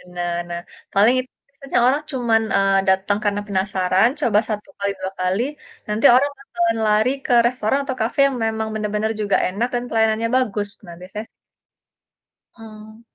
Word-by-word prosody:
Nah 175 0 -2 0.2
nah 170 0 -4 0.3
paling 215 +6 +5
itu 255 0 -5 0.3
sih 275 - -12
soalnya 255 +4 +3
cuman, 235 -3 +2
eee, 195 0 +3
datang 190 +2 +2
karena 205 -1 0
penasaran 190 +1 +2
coba 215 -7 +3
1, 210 -1 -4
kali 200 0 0
2 190 0 -4
kali, 185 +3 0 0.5
nanti 210 +1 -1
orang 285 +3 +3
bakalan 230 -4 -1
lari 215 +3 +3 0.2
ke 250 - +1
restoran 245 +1 0
atau 260 -1 -3
cafe 225 +5 -2
yang 270 -2 -3
memang 220 0 -2
benar-benar 215 0 -1
juga 200 -2 +2
enak 205 +6 -1
dan 240 - -1
pelayanannya 220 0 +1
bagus 210 -5 0 0.2
nah 175 - -10
biasanya 190 +4 -7
s - - -38 1.3
Mmm. 215 0 -12
215 Hz, 165 wpm, -21 LUFS, 200-235 Hz, 1.3 s, paling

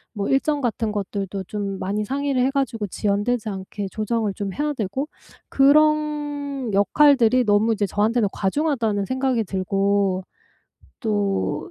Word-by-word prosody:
뭐 200 -1 -2
일정 285 +2 +1
같은 225 -3 -1
것들도 195 -1 -4
좀 200 -1 -4
많이 205 +3 -2
상의를 275 0 -1
해 270 - +2
가지고 255 -6 -1
지연되지 210 +4 -1
않게 195 +1 -5
조정을 215 -1 -1
좀 200 -3 -4
해야 295 0 -1
되고 255 +5 -3 0.4
그런 290 -2 +2
역할들이 250 +3 +4
너무 210 +2 +3
이제 205 -1 0
저한테는 215 +2 +1
'과중하다.'는 220 -3 0
생각이 260 -2 0
들고 195 0 0 0.8
또 205 - -1
220 Hz, 290 characters per minute, -22 LUFS, 200-270 Hz, 0.8 s, 역할들이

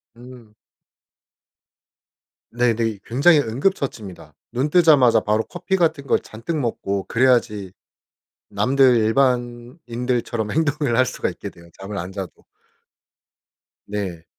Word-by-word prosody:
음. 120 -3 -14 2.0
네네. 115 -3 0
굉장히 145 +7 +4
응급처치입니다. 115 - -3 0.2
눈 130 +5 0
뜨자마자 150 -8 +5
바로 110 +1 0
커피 180 - -3
같은 160 -6 0
거 - - +3
잔뜩 135 +10 -6
먹고 100 -7 -2
그래야지 115 -6 +1 0.8
남들 125 +5 +3
일반인들처럼 120 -1 -1
행동을 145 -5 0
할 130 +1 +4
수가 - - -3
있게 - - -8
돼요, 85 0 -17
잠을 100 +2 -7
안 90 +1 -6
자도. 95 -2 -6 1.5
네. 95 -5 -5
120 Hz, 240 characters per minute, -21 LUFS, 105-140 Hz, 2.0 s, 뜨자마자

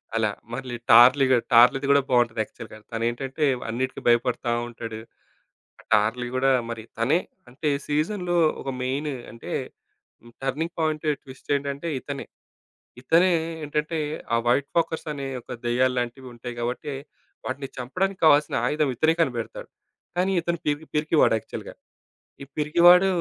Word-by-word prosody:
అలా 110 -2 +2 0.2
మళ్ళీ 125 -1 -5
'టార్లీ 125 +4 +8 0.3
టార్లీది' 130 +4 +6
గూడా 140 - +5
బావుంటది 120 -3 +2
యాక్చువల్‍గా. 110 - -12
తనేంటంటే 125 +6 -1 0.2
అన్నిటికి 130 +3 -3
భయపడతా 120 0 +2 0.2
ఉంటాడు. 115 -2 -7 0.8
ఆ - - -14
'టార్లీ' 110 +4 +2
గూడా 135 +1 +3 0.2
మరి 115 -1 -5 0.2
తనే 140 +9 +3 0.3
అంటే 150 +5 -2 0.2
సీజన్‍లో 175 +4 0 0.2
ఒక - - -5
మెయిన్ 140 +4 -2 0.2
అంటే 115 - -9 0.7
హ్మ్. 120 0 -17
టర్నింగ్ 155 +6 -2
పాయింట్, 155 -1 -1 0.2
ట్విస్ట్ 130 0 -14
ఏంటంటే 140 +3 -4
ఇతనే. 140 +1 -6 0.8
ఇతనే 170 +7 +4 0.3
ఏంటంటే 150 +2 -2 0.4
ఆ - - +3
'వైట్ 135 +4 +2
ఫాకర్స్' 165 -1 0
అనే 140 -2 -5
యొక్క 120 - -10
దెయ్యాల్లాంటివుంటాయి 125 0 -1
గాబట్ట, 120 +5 -3 0.6
వాటిని 135 +1 -4
చంపడానికి 185 +10 -2
కావాల్సిన 150 -1 +5
ఆయుధం 150 -3 +1
ఇతనే 160 +6 +3
కనిపెడతాడు. 120 -7 -3 0.5
కానీ 190 +2 +2
ఇతను 170 0 -2
పె 150 - +3 0.2
పిరికివాడు 150 -5 +3
యాక్చువల్‍గా. - - -9 0.7
ఈ - - -9
పిరికివాడు 175 +5 +6
135 Hz, 125 wpm, -25 LUFS, 120-155 Hz, 0.8 s, టార్లీ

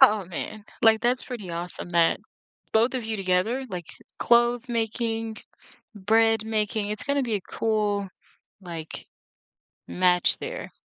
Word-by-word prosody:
Oh, 215 -7 +7
man, 205 +4 -6 0.2
like, 220 -1 +6
that's 245 +1 +1
pretty 215 -8 -6
awesome 175 +1 -5
that 170 -1 +3 0.5
both 230 +4 +3
of 245 -3 -2
you 220 -1 -2
together, 195 +7 +1
like, 180 -4 -5 0.3
clothe 240 +1 +4
making, 225 -1 -1 0.6
bread 220 +2 +3
making, 215 -1 -1
it's 210 - -2
gonna 280 -1 +1
be 225 -3 -1
a 195 - -2
cool, 205 -3 -1 0.5
like, 165 -3 -7 0.8
match 180 -1 +3
there. - - -6
220 Hz, 135 wpm, -26 LUFS, 190-235 Hz, 0.8 s, Oh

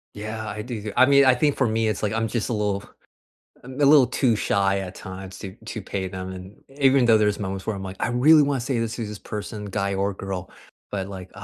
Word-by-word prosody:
Yeah, 110 +1 -5
I 105 0 -5
do 120 -2 -5
th 105 -1 -6
I 130 - +7
mean, 140 0 +6
I 130 - +6
think 145 +3 +1
for 130 - +2
me, 110 0 +1
it's 105 - -2
like, 105 -1 0
I'm 115 0 0
just 115 -1 -2
a - - -2
little 105 -2 -1 0.8
um, 130 +1 -9
a - - +5
little 140 -2 +7
too 120 -2 +1
shy 100 -1 +1
at 95 -1 -7
times 95 0 -9
to 95 -2 -7
to 110 -1 -6
pay 95 0 -3
them 95 0 -6
and 95 +2 -10 0.2
even 135 -2 +4
though 115 -1 +6
there's 105 -1 +1
moments 95 -1 -4
where 110 - -1
I'm 95 - -6
like, 95 0 -7
"I - - 0
really 145 +6 +6
wanna 140 -2 0
say 125 0 -1
this 115 +1 -3
is 115 -3 -3
this 105 -1 -7
person, 105 +1 -6
guy 100 0 -2
or 100 +1 0
girl," 95 -1 -5 0.4
but, 95 -2 -3
like, 95 -2 -8
105 Hz, 250 wpm, -24 LUFS, 95-120 Hz, 0.8 s, I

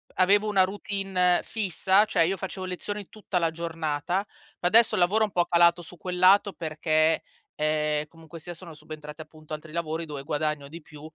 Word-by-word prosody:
avevo 200 +3 +4
una 200 -3 +4
routine 190 -2 0
fissa, 200 -1 +1
cioè 175 -6 +2
io 190 +3 -1
facevo 190 +1 -5
lezioni 200 +2 -5
tutta 205 -3 -4
la 165 -2 +1
giornata, 165 +2 -2 0.3
ma 175 - +1
adesso 225 +3 +6
il - - 0
lavoro 205 +5 +3
è - - +5
un 205 - -8
po' 175 -1 +2
calato 170 0 +4
su 175 +1 -12
quel 180 +2 -5
lato 195 +2 +5
perché, 155 0 +1 0.3
ehm, 150 0 0
comunque 165 0 -13
sia 175 +3 -8
sono 170 -1 -11
subentrati, 150 0 -10
appunto, 155 0 -11
altri 155 0 -8
lavori 165 0 -3
dove 145 -3 -7
guadagno 150 -1 -2
di 165 +2 -10
più. 150 -1 -14
170 Hz, 190 wpm, -26 LUFS, 155-190 Hz, 0.3 s, adesso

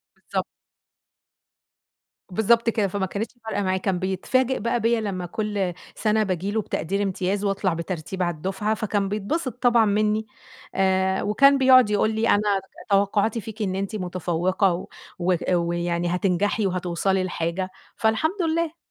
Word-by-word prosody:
بالضبط. - - -3 1.9
بالضبط 230 +4 +3
كده 215 -3 +1
فما 195 0 -2
كانتش 205 +4 -4
فارقة 205 -2 -1
معاه، 185 0 +1
كان 190 -1 -1
بيتفاجئ 235 +8 0
بقى 235 +2 0
بيَّ 230 0 +2
لما 190 -4 -3
كلّ 200 -1 -2 0.2
سَنَة 215 0 +2
باجي 190 0 -2
له 220 +1 0
بتقدير 195 +1 -2
إمتياز 195 +1 -1
واطلَع 195 -2 0
بترتيب 170 +2 -4
على 175 -1 -1
الدفعة 190 +6 -2
فكان 205 -2 -1
بيتبسط 225 +7 -2
طبعًا 240 -2 +5
منّي 215 +1 +1 0.5
آآ، 190 0 +2
وكان 275 +7 +5
بيقعُد 260 -4 +6
يقول 210 +1 +2
لي 220 +1 +1
أنا - - +5 0.2
كان 190 - -16
توقُّعاتي 205 +3 +2
فيكِ 220 +1 -8
إن 190 -3 -1
أنتِ 195 +2 -3
متفوّقة 185 0 0
و 175 - -5 0.3
وهأ 180 0 +1
ويعني 175 0 0
هتنجَحي 195 +3 +1
وهتوصَلي 185 +1 0
لحاجة، 180 +1 -2 0.3
فالحمد 315 - +1
لله. 330 0 0
200 Hz, 145 wpm, -24 LUFS, 185-220 Hz, 1.9 s, بيقعُد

